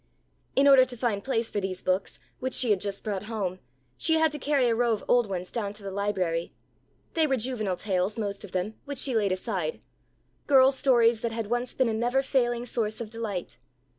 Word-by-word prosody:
In 275 Hz, +1 st, +5 dB
order 270 Hz, -2 st, +8 dB
to 250 Hz, -1 st, -6 dB
find 220 Hz, -4 st, -1 dB
place 230 Hz, -4 st, -1 dB
for 205 Hz, -, -1 dB
these 185 Hz, -1 st, -4 dB
books, 185 Hz, +1 st, -1 dB, 0.2 s
which 260 Hz, 0 st, -1 dB
she 245 Hz, -4 st, +4 dB
had 195 Hz, -3 st, +2 dB
just 200 Hz, -1 st, -3 dB
brought 205 Hz, -2 st, -3 dB
home, 200 Hz, -5 st, -3 dB, 0.4 s
she 320 Hz, -, +3 dB
had 320 Hz, -1 st, +3 dB
to 295 Hz, -, -5 dB
carry 275 Hz, -1 st, +2 dB
a 235 Hz, -, +3 dB
row 235 Hz, 0 st, +2 dB
of 210 Hz, -, -4 dB
old 240 Hz, -4 st, +3 dB
ones 180 Hz, -1 st, -4 dB
down 205 Hz, -4 st, -3 dB
to 210 Hz, -1 st, -11 dB
the 195 Hz, -, -5 dB
library. 190 Hz, -4 st, -2 dB, 0.6 s
They 320 Hz, -2 st, +3 dB
were 265 Hz, -2 st, +1 dB
juvenile 215 Hz, -6 st, -1 dB
tales, 190 Hz, +1 st, -1 dB
most 200 Hz, -2 st, -3 dB
of 200 Hz, -, -10 dB
them, 185 Hz, +4 st, -2 dB
which 285 Hz, -1 st, -5 dB
she 265 Hz, 0 st, +1 dB
laid 210 Hz, -4 st, +1 dB
aside; 185 Hz, -4 st, -2 dB, 0.7 s
girls' 265 Hz, -1 st, +5 dB
stories 235 Hz, -4 st, +4 dB
that 235 Hz, -, -1 dB
had 225 Hz, -1 st, -4 dB
once 240 Hz, +1 st, -1 dB
been 260 Hz, -, +2 dB
a 225 Hz, -, 0 dB
never 245 Hz, +4 st, +1 dB
failing 240 Hz, -3 st, 0 dB
source 220 Hz, -3 st, -2 dB
of 225 Hz, -2 st, -6 dB
delight. 215 Hz, -6 st, -5 dB
225 Hz, 215 wpm, -27 LUFS, 200-250 Hz, 0.7 s, order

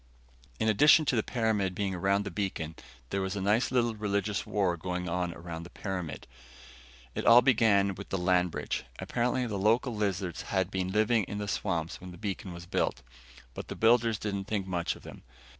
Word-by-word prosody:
In 110 Hz, -, +1 dB
addition 145 Hz, +9 st, +6 dB
to 130 Hz, -, +1 dB
the 110 Hz, -, +3 dB
pyramid 110 Hz, -6 st, 0 dB
being 100 Hz, -1 st, -1 dB
around 100 Hz, +3 st, +1 dB
the 100 Hz, -, -5 dB
beacon, 90 Hz, -6 st, -3 dB, 0.4 s
there 100 Hz, -, 0 dB
was 95 Hz, +1 st, -2 dB
a -, -, -2 dB
nice 105 Hz, +5 st, +2 dB
little 120 Hz, -2 st, +2 dB
religious 105 Hz, -1 st, -1 dB
war 95 Hz, -4 st, +1 dB
going 90 Hz, +1 st, -4 dB
on 90 Hz, 0 st, -1 dB
around 85 Hz, -1 st, -7 dB
the 85 Hz, -, -10 dB
pyramid. 90 Hz, -8 st, -5 dB, 0.9 s
It -, -, -3 dB
all 120 Hz, +1 st, +9 dB
began 105 Hz, -6 st, +4 dB
with 100 Hz, +2 st, -9 dB
the 95 Hz, -, -1 dB
land 90 Hz, 0 st, +2 dB
bridge. -, -, -3 dB
Apparently 125 Hz, +1 st, 0 dB
the 105 Hz, -4 st, -3 dB
local 115 Hz, +4 st, +2 dB
lizards 95 Hz, -4 st, -2 dB
had 95 Hz, -1 st, -1 dB
been 95 Hz, -1 st, -2 dB
living 110 Hz, +2 st, +3 dB
in 100 Hz, -, -5 dB
the 105 Hz, 0 st, -3 dB
swamps 85 Hz, -4 st, -2 dB
when 90 Hz, -, -8 dB
the 90 Hz, -, -10 dB
beacon 100 Hz, -1 st, -4 dB
was 85 Hz, 0 st, -9 dB
built, 70 Hz, -5 st, -1 dB, 0.5 s
but -, -, -7 dB
the -, -, -6 dB
builders 115 Hz, -1 st, +4 dB
didn't 100 Hz, -2 st, -3 dB
think 100 Hz, -2 st, -2 dB
much 85 Hz, -3 st, -1 dB
of -, -, -15 dB
them. -, -, -10 dB
100 Hz, 195 wpm, -30 LUFS, 90-110 Hz, 0.9 s, all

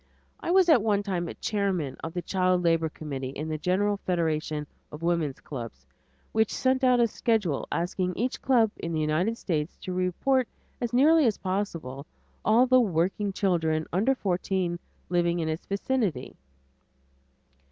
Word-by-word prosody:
I -, -, -5 dB
was 370 Hz, 0 st, +5 dB
at 300 Hz, -9 st, +6 dB
one 205 Hz, -2 st, +1 dB
time 180 Hz, -4 st, -2 dB
chairman 190 Hz, -10 st, -1 dB
of 165 Hz, +1 st, -5 dB
the 175 Hz, -, -2 dB
Child 185 Hz, 0 st, +1 dB
Labor 165 Hz, -1 st, +2 dB
Committee 140 Hz, -4 st, -5 dB
in 150 Hz, +4 st, -5 dB
the 155 Hz, -1 st, -3 dB
General 200 Hz, +5 st, +1 dB
Federation 155 Hz, -5 st, -1 dB, 0.3 s
of 150 Hz, +2 st, -9 dB
Woman's 165 Hz, -5 st, 0 dB
Clubs, 115 Hz, -, -8 dB, 0.5 s
which 220 Hz, -1 st, +2 dB
sent 260 Hz, 0 st, +1 dB
out 250 Hz, -1 st, +5 dB
a 235 Hz, -, +5 dB
schedule 210 Hz, -, 0 dB
asking 180 Hz, +1 st, -1 dB
each 250 Hz, +4 st, -2 dB
club 235 Hz, -5 st, +3 dB
in 170 Hz, -, -4 dB
the 160 Hz, -, 0 dB
United 160 Hz, +9 st, 0 dB
States 155 Hz, -5 st, -2 dB
to 185 Hz, -, -4 dB
report 205 Hz, +8 st, +1 dB, 0.3 s
as 240 Hz, -2 st, -1 dB
nearly 295 Hz, +3 st, +5 dB
as 215 Hz, -, +1 dB
possible 165 Hz, -8 st, -3 dB, 0.4 s
all 230 Hz, +4 st, +5 dB
the 255 Hz, 0 st, +5 dB
working 195 Hz, 0 st, 0 dB
children 160 Hz, -5 st, 0 dB
under 225 Hz, +9 st, +2 dB
fourteen 185 Hz, -4 st, -1 dB, 0.3 s
living 175 Hz, -1 st, +1 dB
in 165 Hz, -2 st, -1 dB
its 160 Hz, +1 st, -4 dB
vicinity. 200 Hz, -, -1 dB
180 Hz, 155 wpm, -27 LUFS, 160-220 Hz, 0.5 s, at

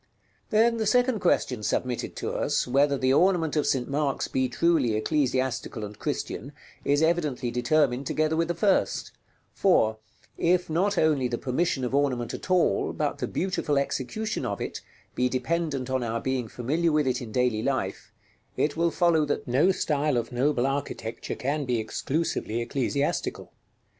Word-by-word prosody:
§ -, -, -45 dB
LVI. -, -, -41 dB
Then 230 Hz, +1 st, +3 dB
the 220 Hz, -2 st, -1 dB
second 245 Hz, +1 st, +3 dB
question 130 Hz, -, +1 dB
submitted 125 Hz, +3 st, -2 dB
to -, -, -3 dB
us, -, -, 0 dB
whether 140 Hz, +2 st, +3 dB
the 130 Hz, 0 st, +2 dB
ornament 170 Hz, -1 st, +3 dB
of 150 Hz, -, +1 dB
St. 125 Hz, -2 st, +1 dB
Mark's 140 Hz, -1 st, -1 dB
be 130 Hz, -1 st, 0 dB
truly 140 Hz, -5 st, +2 dB
ecclesiastical 130 Hz, -3 st, -1 dB
and 105 Hz, 0 st, -10 dB
Christian, -, -, -4 dB, 0.3 s
is 145 Hz, +2 st, +2 dB
evidently 155 Hz, -7 st, 0 dB
determined 125 Hz, +1 st, +1 dB
together 155 Hz, 0 st, +1 dB
with 165 Hz, +1 st, +1 dB
the 175 Hz, -, -2 dB
first; 195 Hz, +3 st, +1 dB, 0.4 s
for, 110 Hz, -, +3 dB, 0.4 s
if 175 Hz, -1 st, +2 dB
not 190 Hz, +5 st, +1 dB
only 150 Hz, -5 st, +3 dB
the 120 Hz, -1 st, -2 dB
permission 135 Hz, +2 st, -1 dB
of 125 Hz, -, -4 dB
ornament 130 Hz, -4 st, 0 dB
at -, -, -7 dB
all, 180 Hz, -, +2 dB
but -, -, -2 dB
the -, -, -2 dB
beautiful 180 Hz, -6 st, -1 dB
execution 140 Hz, -, -2 dB
of -, -, -3 dB
it, -, -, -5 dB, 0.3 s
be 125 Hz, 0 st, +1 dB
dependent 140 Hz, +1 st, -1 dB
on 130 Hz, -1 st, -1 dB
our 115 Hz, -1 st, -2 dB
being 130 Hz, -2 st, -2 dB
familiar 150 Hz, +10 st, 0 dB
with 150 Hz, -1 st, +2 dB
it 130 Hz, -1 st, 0 dB
in 115 Hz, -3 st, -7 dB
daily 125 Hz, -2 st, +1 dB
life, 105 Hz, -5 st, -2 dB, 0.5 s
it 150 Hz, -, +1 dB
will 170 Hz, +1 st, +2 dB
follow 165 Hz, -2 st, +3 dB
that 145 Hz, -, -2 dB
no 140 Hz, +10 st, +4 dB
style 150 Hz, -6 st, 0 dB
of 115 Hz, 0 st, -2 dB
noble 125 Hz, +1 st, +1 dB
architecture 135 Hz, -5 st, -3 dB
can 145 Hz, +3 st, -1 dB
be 125 Hz, -3 st, 0 dB
exclusively 115 Hz, +1 st, -2 dB
ecclesiastical. 135 Hz, +4 st, -2 dB
140 Hz, 170 wpm, -26 LUFS, 125-165 Hz, 0.5 s, no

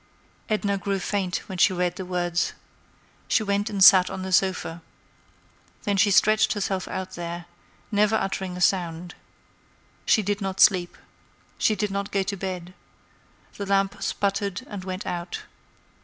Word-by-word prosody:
Edna 205 Hz, -2 st, 0 dB
grew 195 Hz, +1 st, -1 dB
faint 190 Hz, -1 st, -2 dB
when 190 Hz, -2 st, -6 dB
she 190 Hz, -, +5 dB
read 180 Hz, -1 st, -1 dB
the 190 Hz, -, -6 dB
words. 175 Hz, -1 st, -1 dB, 0.7 s
She 220 Hz, -, +2 dB
went 200 Hz, +1 st, 0 dB
and 200 Hz, -2 st, +2 dB
sat 185 Hz, -2 st, +8 dB
on 185 Hz, -, -5 dB
the 190 Hz, -, -5 dB
sofa. 185 Hz, -3 st, +1 dB, 1.0 s
Then 205 Hz, -2 st, 0 dB
she 205 Hz, +2 st, +4 dB
stretched 215 Hz, +2 st, +4 dB
herself 190 Hz, -2 st, -2 dB
out 190 Hz, 0 st, -5 dB
there, 170 Hz, 0 st, -6 dB, 0.5 s
never 210 Hz, +1 st, +3 dB
uttering 190 Hz, -3 st, -2 dB
a -, -, -6 dB
sound. 175 Hz, -2 st, 0 dB, 0.9 s
She 215 Hz, -, +4 dB
did 205 Hz, +1 st, -2 dB
not 195 Hz, -1 st, -3 dB
sleep. 180 Hz, -3 st, +4 dB, 0.6 s
She 215 Hz, -, +3 dB
did 210 Hz, -1 st, -2 dB
not 200 Hz, 0 st, -3 dB
go 195 Hz, -1 st, +1 dB
to 200 Hz, +1 st, -3 dB
bed. 185 Hz, -2 st, -5 dB, 0.8 s
The 200 Hz, -, -4 dB
lamp 195 Hz, 0 st, +1 dB
sputtered 200 Hz, +1 st, -1 dB
and 200 Hz, -7 st, -7 dB
went 185 Hz, +1 st, -5 dB
out. 175 Hz, -1 st, -4 dB
190 Hz, 155 wpm, -25 LUFS, 180-200 Hz, 1.0 s, sat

